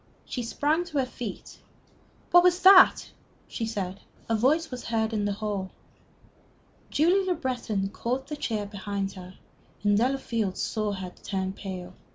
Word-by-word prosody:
She 250 Hz, -, -4 dB
sprang 295 Hz, +8 st, 0 dB
to 320 Hz, -4 st, -5 dB
her 265 Hz, -, +2 dB
feet. 240 Hz, -5 st, -8 dB, 0.7 s
"What 350 Hz, -, +8 dB
was 360 Hz, 0 st, +3 dB
that?" 375 Hz, 0 st, +7 dB, 0.4 s
she 225 Hz, -, -4 dB
said. 195 Hz, -4 st, -4 dB, 0.3 s
A 225 Hz, -, +1 dB
voice 295 Hz, +8 st, +2 dB
was 250 Hz, -1 st, -6 dB
heard 225 Hz, -1 st, 0 dB
in 210 Hz, -2 st, 0 dB
the 205 Hz, -, 0 dB
hall. 205 Hz, -2 st, -3 dB, 1.2 s
Julie 355 Hz, +6 st, +3 dB
Le 365 Hz, -, +2 dB
Breton 245 Hz, -9 st, -2 dB
caught 250 Hz, +5 st, -3 dB
the 300 Hz, -, -5 dB
chair 220 Hz, -7 st, -2 dB
behind 200 Hz, -1 st, -4 dB
her, 185 Hz, -1 st, -11 dB, 0.5 s
and 205 Hz, 0 st, +4 dB
Delafield 230 Hz, -4 st, 0 dB
saw 215 Hz, -2 st, -1 dB
her 190 Hz, -2 st, -6 dB
turn 190 Hz, -1 st, -2 dB
pale. 185 Hz, -2 st, -7 dB
220 Hz, 155 wpm, -27 LUFS, 200-270 Hz, 1.2 s, What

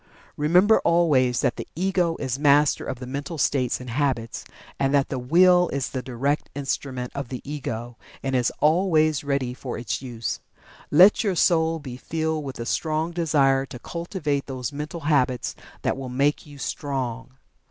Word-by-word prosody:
Remember 180 Hz, +9 st, +4 dB
always 140 Hz, -8 st, +3 dB
that -, -, 0 dB
the -, -, -6 dB
Ego 180 Hz, -1 st, +1 dB
is 130 Hz, -1 st, -2 dB
master 145 Hz, 0 st, +4 dB
of 130 Hz, -, -4 dB
the 125 Hz, -, -7 dB
mental 140 Hz, +5 st, -5 dB
states 130 Hz, -3 st, +1 dB
and 125 Hz, -1 st, -7 dB
habits, 125 Hz, -3 st, -1 dB, 0.4 s
and 135 Hz, +1 st, +2 dB
that 140 Hz, -1 st, +2 dB
the 130 Hz, -, -2 dB
Will 180 Hz, +6 st, +5 dB
is 140 Hz, -2 st, -2 dB
the 130 Hz, -, -3 dB
direct 135 Hz, +4 st, -2 dB
instrument 135 Hz, -2 st, -3 dB
of 140 Hz, -2 st, -4 dB
the 125 Hz, -, -5 dB
Ego, 120 Hz, -5 st, -5 dB, 0.2 s
and 135 Hz, -1 st, -1 dB
is 125 Hz, -1 st, +2 dB
always 155 Hz, -3 st, +3 dB
ready 140 Hz, -3 st, -1 dB
for 125 Hz, 0 st, -6 dB
its 120 Hz, -1 st, -3 dB
use. 120 Hz, -4 st, -4 dB, 0.5 s
Let 185 Hz, +10 st, +6 dB
your 200 Hz, -4 st, 0 dB
soul 165 Hz, -1 st, +3 dB
be 130 Hz, -5 st, -8 dB
filled 160 Hz, +2 st, -2 dB
with 135 Hz, -1 st, -6 dB
the 115 Hz, -, -5 dB
strong 160 Hz, +5 st, -1 dB
Desire 140 Hz, -5 st, +2 dB
to 125 Hz, -, -8 dB
cultivate 155 Hz, -, -3 dB
those 130 Hz, 0 st, -4 dB
mental 150 Hz, +4 st, -5 dB
habits 130 Hz, -5 st, +1 dB, 0.3 s
that -, -, +1 dB
will 135 Hz, -1 st, -6 dB
make 140 Hz, +5 st, 0 dB
you 145 Hz, -1 st, -12 dB
Strong. 130 Hz, -4 st, -4 dB
140 Hz, 170 wpm, -24 LUFS, 130-160 Hz, 0.5 s, Let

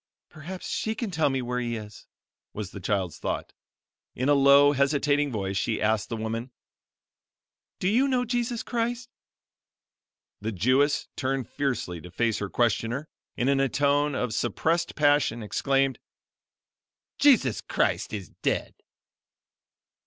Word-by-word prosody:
"Perhaps 175 Hz, +5 st, -8 dB
she 220 Hz, 0 st, -2 dB
can 220 Hz, -2 st, -3 dB
tell 160 Hz, -4 st, +2 dB
me 135 Hz, -1 st, -1 dB
where 125 Hz, +1 st, -2 dB
He 120 Hz, -1 st, -2 dB
is," 105 Hz, -2 st, -9 dB, 0.5 s
was 105 Hz, -2 st, -5 dB
the 100 Hz, -, -8 dB
child's 95 Hz, -3 st, -2 dB
thought. -, -, -3 dB, 0.6 s
In 130 Hz, +3 st, 0 dB
a -, -, +6 dB
low, 140 Hz, +1 st, +6 dB
hesitating 145 Hz, +1 st, +2 dB
voice, 100 Hz, -3 st, -2 dB
she 110 Hz, +3 st, 0 dB
asked 110 Hz, 0 st, +1 dB
the 115 Hz, -, -3 dB
woman: 115 Hz, +3 st, -3 dB, 1.3 s
"Do 185 Hz, -, -1 dB
you 245 Hz, +8 st, +3 dB
know 255 Hz, -2 st, +1 dB
Jesus 240 Hz, 0 st, -1 dB
Christ?" 240 Hz, +1 st, -2 dB, 1.3 s
The 110 Hz, +2 st, -3 dB
Jewess 130 Hz, +9 st, +2 dB
turned 130 Hz, -2 st, -2 dB
fiercely 125 Hz, -, -2 dB
to 90 Hz, -, -10 dB
face 115 Hz, +5 st, 0 dB
her 100 Hz, -, -3 dB
questioner 120 Hz, +6 st, 0 dB, 0.3 s
and 120 Hz, -, 0 dB
in 140 Hz, 0 st, +3 dB
a 135 Hz, -1 st, +2 dB
tone 145 Hz, +1 st, +2 dB
of 125 Hz, -4 st, -1 dB
suppressed 165 Hz, +9 st, 0 dB
passion, 145 Hz, -6 st, +2 dB
exclaimed: 135 Hz, +5 st, +1 dB, 1.2 s
"Jesus 210 Hz, -, +4 dB
Christ -, -, 0 dB
is 100 Hz, -4 st, -5 dB
dead!" -, -, -1 dB
135 Hz, 140 wpm, -27 LUFS, 110-150 Hz, 1.3 s, a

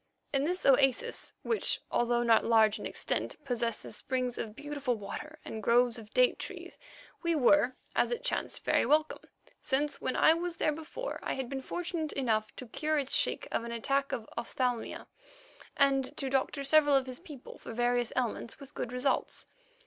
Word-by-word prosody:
In 275 Hz, 0 st, +2 dB
this 360 Hz, +3 st, -2 dB
oasis, 270 Hz, -2 st, +2 dB
which, 455 Hz, -, +2 dB
although 240 Hz, 0 st, +2 dB
not 230 Hz, -1 st, +5 dB
large 220 Hz, -2 st, +4 dB
in -, -, -4 dB
extent, -, -, -2 dB
possesses 235 Hz, -4 st, -2 dB
springs 255 Hz, -2 st, -2 dB
of 215 Hz, -1 st, -4 dB
beautiful 290 Hz, -3 st, -2 dB
water 295 Hz, +9 st, -7 dB
and 220 Hz, -, -5 dB
groves 240 Hz, +2 st, +3 dB
of 215 Hz, -1 st, -13 dB
date -, -, +3 dB
trees, -, -, -7 dB, 0.4 s
we 335 Hz, -1 st, +1 dB
were, 260 Hz, -2 st, +4 dB, 0.2 s
as -, -, +3 dB
it 485 Hz, 0 st, -3 dB
chanced, -, -, -2 dB
very -, -, +3 dB
welcome, 310 Hz, +1 st, +2 dB, 0.4 s
since 290 Hz, +1 st, 0 dB
when 260 Hz, -, -1 dB
I 315 Hz, -, +6 dB
was 340 Hz, 0 st, -3 dB
there 305 Hz, -, +2 dB
before, 325 Hz, +12 st, -6 dB
I -, -, -2 dB
had 265 Hz, -2 st, -4 dB
been 270 Hz, -1 st, -3 dB
fortunate 335 Hz, +1 st, -3 dB
enough 220 Hz, -5 st, 0 dB
to 255 Hz, -, -8 dB
cure 305 Hz, +6 st, -1 dB
its 275 Hz, -2 st, 0 dB
sheik -, -, +1 dB
of -, -, 0 dB
an 235 Hz, -, -5 dB
attack 275 Hz, +4 st, 0 dB
of 220 Hz, -, -3 dB
ophthalmia 240 Hz, 0 st, -2 dB, 0.7 s
and 270 Hz, -1 st, +2 dB
to 270 Hz, -1 st, -2 dB
doctor 275 Hz, +1 st, 0 dB
several 290 Hz, 0 st, +5 dB
of 270 Hz, -1 st, +3 dB
his 255 Hz, -1 st, -6 dB
people 300 Hz, -7 st, -11 dB
for -, -, -8 dB
various 240 Hz, 0 st, +1 dB
ailments 240 Hz, -1 st, -2 dB
with 280 Hz, 0 st, -12 dB
good 245 Hz, -, -4 dB
results. 250 Hz, +2 st, 0 dB
265 Hz, 180 wpm, -31 LUFS, 240-295 Hz, 0.7 s, I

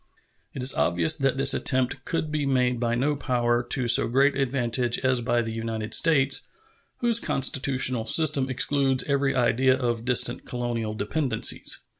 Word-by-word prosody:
It 130 Hz, -, -5 dB
is 130 Hz, -, +5 dB
obvious 85 Hz, -1 st, +1 dB
that 135 Hz, -1 st, -1 dB
this 135 Hz, 0 st, +4 dB
attempt 130 Hz, 0 st, -2 dB
could 160 Hz, -3 st, -3 dB
be 150 Hz, -2 st, -2 dB
made 125 Hz, -2 st, 0 dB
by 120 Hz, -1 st, -1 dB
no 145 Hz, +5 st, 0 dB
power 120 Hz, -3 st, -1 dB
to 125 Hz, +1 st, -3 dB
so 120 Hz, -, +4 dB
great 135 Hz, +4 st, +2 dB
advantage 125 Hz, -3 st, -1 dB
as 130 Hz, -2 st, +2 dB
by 120 Hz, 0 st, 0 dB
the 115 Hz, -1 st, -6 dB
United 115 Hz, -1 st, -5 dB
States, 140 Hz, -4 st, +3 dB, 0.6 s
whose 235 Hz, -1 st, +2 dB
constitutional 130 Hz, -, 0 dB
system 145 Hz, -2 st, +2 dB
excludes 135 Hz, 0 st, 0 dB
every 140 Hz, -1 st, -1 dB
idea 130 Hz, +1 st, +2 dB
of 120 Hz, -3 st, -3 dB
distant 125 Hz, -1 st, 0 dB
colonial 120 Hz, -3 st, -4 dB
dependencies. 115 Hz, +3 st, -1 dB
130 Hz, 155 wpm, -24 LUFS, 120-135 Hz, 0.6 s, is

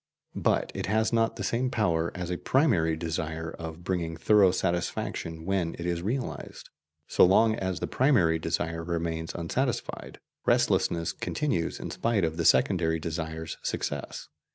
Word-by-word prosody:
But -, -, +1 dB
it -, -, -4 dB
has 110 Hz, +2 st, +1 dB
not 115 Hz, 0 st, +2 dB
the 105 Hz, -, -5 dB
same 120 Hz, +5 st, 0 dB
power 85 Hz, -8 st, +1 dB
as 90 Hz, -1 st, -4 dB
a 90 Hz, -, -1 dB
primary 105 Hz, -, +2 dB
desire 80 Hz, 0 st, -3 dB
of 80 Hz, +1 st, -7 dB
bringing 85 Hz, -3 st, -2 dB
thorough 100 Hz, +3 st, +5 dB
satisfaction 85 Hz, -2 st, -2 dB
when 95 Hz, -3 st, 0 dB
it 85 Hz, -, -6 dB
is 85 Hz, -1 st, -1 dB
realized; 120 Hz, +7 st, -4 dB, 0.4 s
so -, -, +4 dB
long 110 Hz, +5 st, +5 dB
as 95 Hz, -4 st, -3 dB
the -, -, 0 dB
primary 100 Hz, -, +3 dB
desire 80 Hz, +1 st, -2 dB
remains 80 Hz, -1 st, -3 dB
unsatisfied, 120 Hz, +10 st, -3 dB, 0.2 s
restlessness 85 Hz, -1 st, +2 dB
continues 140 Hz, -, -2 dB
in -, -, -5 dB
spite 115 Hz, -5 st, 0 dB
of 80 Hz, 0 st, -1 dB
the 85 Hz, -, -1 dB
secondary 85 Hz, -2 st, +3 dB
desire's 80 Hz, 0 st, -4 dB
success. -, -, -4 dB
85 Hz, 150 wpm, -28 LUFS, 80-105 Hz, 0.4 s, thorough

